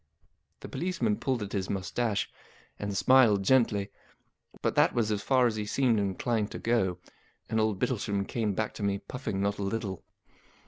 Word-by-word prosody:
The - - -7
police¬ 180 +2 -3
man 110 -4 +2
pulled 130 -5 -1
at 100 - -7
his 95 -2 -2
moustache, 105 +3 -1 0.5
and 100 -1 -3
smiled 115 -6 +5
gently, 105 -4 +2 0.7
but - - +1
that - - +3
was 110 -3 +1
as 105 -1 0
far 130 +1 +3
as 115 -3 +1
he 105 - -2
seemed 120 -1 +2
inclined 105 +2 -1
to - - -4
go; 95 -7 +1 0.5
and 110 0 0
old 110 -2 +1
Bittlesham 100 -3 -1
came 110 -4 -1
back 110 +1 -2
to - - -9
me, 100 -1 +1
puffing 105 -2 -4
not 100 +1 0
a - - -2
little. 100 -2 -3
105 Hz, 180 wpm, -29 LUFS, 100-120 Hz, 0.7 s, smiled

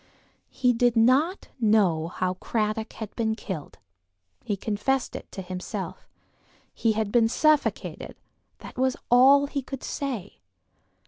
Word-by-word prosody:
He 250 -1 +2
did 240 0 +2
not 265 - +3
know 200 -8 +3
how 180 +1 -2
Cradock 215 +3 -2
had 220 -2 -8
been 220 -2 0
killed; 185 -9 -7 0.7
he 205 - -2
confessed 220 +6 -1
it - - -8
to 190 - -6
himself. 185 0 -6 0.7
He 225 -1 +1
had 215 -1 -1
been 230 -1 +4
suffocated; 305 +4 0 0.4
that - - -11
was 260 0 +1
all 270 +3 +7
he 280 0 -3
could 270 0 -8
say. 245 -9 -4
225 Hz, 130 wpm, -26 LUFS, 205-260 Hz, 0.7 s, all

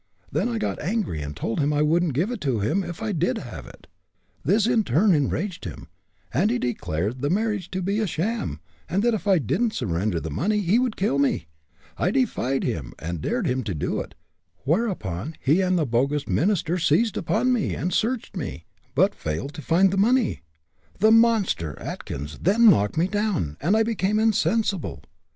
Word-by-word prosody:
Then - - 0
I 235 - -2
got 220 - -2
angry 185 - -1
and 75 0 -6
told 115 - -2
him 145 0 +2
I 150 0 +2
wouldn't 160 -1 +2
give 180 - +1
it 240 - -5
to 130 -6 0
him, 155 - 0
if 175 +4 -6
I 220 - -1
did 175 -1 0
have 90 - -8
it. - - -15 0.6
This 200 +10 +3
in 235 -2 +3
turn 185 - +3
enraged 170 +6 -1
him, 85 - -8 0.4
and 180 - +2
he 245 - +1
declared 110 - -2
the 145 - 0
marriage 205 -2 0
to 185 -1 -3
be 200 +4 0
a 220 - 0
sham, 170 - -2 0.3
and 195 +4 +1
that 240 0 +3
if 210 -1 -3
I 195 -2 +5
didn't 210 - 0
surrender 90 -3 -1
the 80 - -5
money 210 - 0
he 200 +5 +3
would 250 -3 0
kill 160 -8 +1
me. 135 -12 +1 0.5
I 180 - +2
defied 190 - 0
him, 75 - -3
and 85 0 -5
dared 240 -4 -1
him 130 -3 0
to 100 -5 -3
do 75 - -2
it, - - -7 0.5
whereupon 155 - -1
he 155 +8 +3
and 185 -1 +2
the 160 - +1
bogus 135 +4 0
minister 180 -1 +1
seized 185 +8 +2
upon 255 +4 +1
me, 235 -5 0
and 180 - -2
searched 230 +1 -1
me, 135 - -5 0.3
but - - +4
failed 80 - -4
to 155 - -7
find 180 +7 +3
the 195 - -1
money. 235 +4 +2 0.6
The 215 +2 +4
monster, 220 - +3
Atkins, 75 +3 -6
then 215 +5 +6
knocked 105 - +1
me 170 +3 +3
down, 205 - -1
and 185 +9 +3
I 225 - +4
became 215 -2 0
insensible. 210 - +1
175 Hz, 195 wpm, -24 LUFS, 130-215 Hz, 0.6 s, then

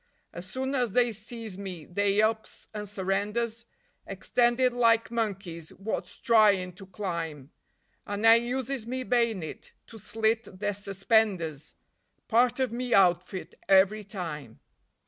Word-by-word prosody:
As 175 +2 -9
soon 265 +4 -3
as 245 -6 0
they 245 -1 +3
sees 220 -2 -7
me 185 -6 -7
they 200 +4 +1
ups 220 0 -2
and 210 -1 -5
surrenders, 210 +4 -2 0.4
Extended 245 +1 +2
like 230 -2 +3
monkeys 195 -8 -3
wot's 205 +3 -5
tryin' 210 -6 +4
to 190 +1 -13
climb; 165 -7 -5 0.6
And 205 +2 -2
I 225 - +10
uses 245 +1 0
me 255 +1 -3
bay'nit 230 -9 -1
to 225 - -12
slit 220 0 -1
their 205 0 -1
suspenders 195 - 0 0.5
Part 240 +2 +3
of 260 -3 +1
me 245 +1 0
outfit 180 -2 +2 0.2
every 195 +2 +5
time. 165 - -7
210 Hz, 125 wpm, -28 LUFS, 185-235 Hz, 0.6 s, I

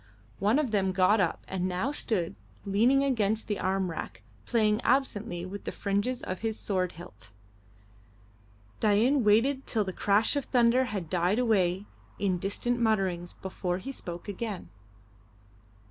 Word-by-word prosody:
One 210 +6 +3
of 290 -6 0
them 190 -3 +1
got 195 +3 +4
up 175 - -1
and 185 -1 -2
now 185 +9 -1
stood 200 - -1 0.3
leaning 235 +8 +3
against 220 -5 0
the 205 -3 -2
arm 190 -1 0
rack, 100 -10 -7 0.2
playing 215 -1 +2
absently 215 -10 0
with 200 +2 -7
the - - -2
fringes 205 +5 -1
of 185 - -4
his 220 -1 -2
sword 185 -3 -1
hilt. 110 - -12 1.5
Dain 230 +6 +3
waited 245 +6 +3
till 220 -3 +1
the 190 -2 -5
crash 205 +8 +2
of 285 - -1
thunder 245 +1 +3
had 200 -8 -4
died 180 +4 +1
away 200 -6 +2 0.3
in 185 -3 0
distant 240 +6 -1
mutterings 190 -6 0
before 180 -1 -3
he 260 +9 -6
spoke 175 -8 -7
again. 205 -1 -5
205 Hz, 145 wpm, -29 LUFS, 185-235 Hz, 1.5 s, got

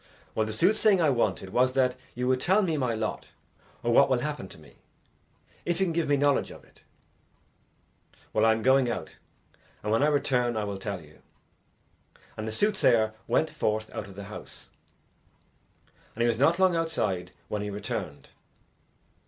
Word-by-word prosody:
"Well, 110 0 0
the - - -3
soothsaying 205 - +3
I 155 -4 +3
wanted 100 -6 -1
was 130 +3 +2
that 130 -1 +2 0.2
you 125 +1 -2
would 130 0 +2
tell 190 +7 +3
me 165 -4 0
my 125 -5 0
lot 110 0 -3 0.6
or - - +1
what - - +6
will - - +3
happen - - -4
to - - -13
me, - - -18 0.9
if 175 0 -1
you 190 - +3
can 170 - -2
give 165 -1 0
me 145 - +4
knowledge 145 0 +2
of - - -12
it." - - -23 1.5
"Well, - - +2
I 110 - +6
am 110 0 -1
going 130 -1 +4
out, - - -5 0.7
and 105 - -2
when 115 - +3
I 145 - +4
return 125 -5 +1
I 110 - -1
will 100 -1 -4
tell 100 -2 -4
you." 75 -1 -18 1.1
And 110 0 -5
the - - -3
soothsayer 115 - +2
went 160 - +1
forth 110 0 -2
out 105 - -5
of 100 - -12
the 100 - -7
house, 105 +2 -10 1.5
and 115 - 0
he - - +3
was 115 -1 0
not 160 +5 +4
long 185 -2 +3
outside 95 - -1 0.2
when 105 - -3
he 105 - -3
returned. 100 0 -5
120 Hz, 180 wpm, -27 LUFS, 110-150 Hz, 1.5 s, what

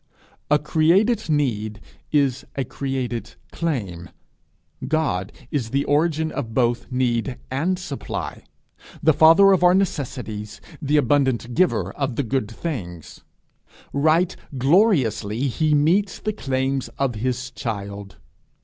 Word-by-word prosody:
A 150 - +5
created 165 +9 +2
need 110 -8 0 0.3
is 140 -4 +2
a 135 - 0
created 130 -2 -4 0.2
claim. 100 - -3 0.8
God 130 -11 0 0.2
is 125 -6 -1
the 140 +3 0
origin 160 +1 +1
of 115 -1 -5
both 120 -1 +1
need 125 0 0
and 165 +8 0
supply, 150 -6 -5 0.6
the 160 - +5
father 165 +7 +7
of 185 -2 +3
our 180 +1 +6
necessities, 125 - -3 0.2
the 150 +1 +2
abundant 130 -3 +1
giver 185 +8 +1
of 135 -4 -2
the 140 - 0
good 125 -3 -1
things. 105 - -6 0.7
Right 160 +5 +2 0.2
gloriously 130 - +2
he 150 +4 +1
meets 180 +7 +2
the 215 - -3
claims 135 -5 -1
of 135 -3 0
his 125 +3 -3
child! 100 -3 -5
135 Hz, 120 wpm, -22 LUFS, 115-160 Hz, 0.8 s, father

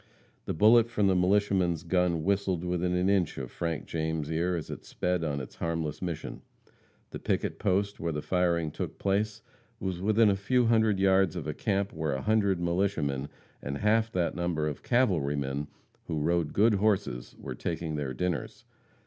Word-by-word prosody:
The - - -3
bullet 115 +6 +6
from 105 -3 +1
the 95 -1 +4
militiaman's 90 -3 +2
gun 90 -2 +1
whistled 95 -2 0
within 90 0 0
an 90 +1 +1
inch 95 -5 +1
of 65 -2 -5
Frank 85 -3 -3
James' 80 -1 -2
ear 85 +3 0
as 80 -4 -5
it - - -7
sped 90 -1 -1
on 70 -3 -1
its 65 - -9
harmless 80 -3 -2
mission. 85 -4 -5 0.7
The - - -6
picket - - -1
post 100 +2 0
where 85 0 -1
the 75 -1 -4
firing 85 -3 +1
took - - -5
place 105 +2 -1 0.4
was 95 -2 -3
within 110 +1 +4
a - - +1
few 120 +6 +2
hundred 110 -3 +3
yards 95 -3 +3
of 85 -5 -4
a 75 - -2
camp 100 +1 -1
where 80 -2 -2
a 65 - -3
hundred 100 -4 +2
militiamen, 85 -6 0 0.3
and 70 0 -4
half 110 +3 +2
that 85 -2 0
number 85 -3 -1
of 75 - -4
cavalrymen, 75 - 0 0.4
who 80 - -2
rode 85 0 +1
good 110 +2 +4
horses, 95 - 0
were - - -6
taking 80 -2 -3
their 70 -3 -3
dinners. 90 -5 -3
90 Hz, 175 wpm, -29 LUFS, 80-100 Hz, 0.7 s, bullet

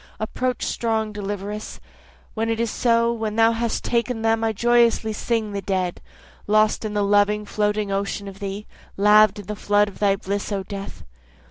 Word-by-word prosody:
Approach 250 +4 -2
strong 220 -2 -1
deliveress, 205 +1 -5 0.5
When 225 0 -1
it 225 0 -1
is 230 -2 0
so, 235 -1 +2
when 220 -2 -3
thou 225 0 +5
hast 230 0 -2
taken 235 -1 -1
them 225 0 +2
I 225 - +2
joyously 235 0 +2
sing 220 0 -1
the 200 0 -3
dead, 185 -2 -2 0.5
Lost 215 +1 +3
in 215 -1 -4
the 205 - +2
loving 205 +1 +2
floating 210 0 -1
ocean 200 +1 -2
of 195 0 -9
thee, 200 +1 -5 0.3
Laved 210 +1 +5
in - - -16
the 210 - -5
flood 205 0 +2
of 195 - -15
thy 200 -1 +3
bliss 200 +2 -4
O 195 -1 -2
death. 195 - -8
210 Hz, 175 wpm, -23 LUFS, 200-225 Hz, 0.5 s, thou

